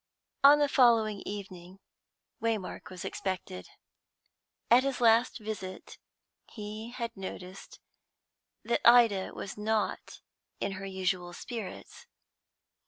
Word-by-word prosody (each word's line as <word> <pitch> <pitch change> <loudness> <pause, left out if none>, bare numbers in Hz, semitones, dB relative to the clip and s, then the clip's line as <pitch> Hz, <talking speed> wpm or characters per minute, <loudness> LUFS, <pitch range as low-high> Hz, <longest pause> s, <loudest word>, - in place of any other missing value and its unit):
On 285 +1 +9
the 295 -1 +3
following 230 -7 +3
evening 190 -2 -8 0.6
Waymark 220 -5 -3
was 185 -1 -8
expected. 180 - -5 1.0
At 240 +2 +8
his 275 -1 -2
last 230 +1 +4
visit 210 -4 -7 0.5
he 215 +1 -7
had 235 -1 -5
noticed 190 -1 -9 0.8
that 235 - 0
Ida 230 -5 +5
was 200 - -7
not 215 0 -2 0.4
in - - -2
her 195 0 -6
usual 185 -2 -2
spirits. 225 +2 -8
210 Hz, 105 wpm, -30 LUFS, 190-235 Hz, 1.0 s, On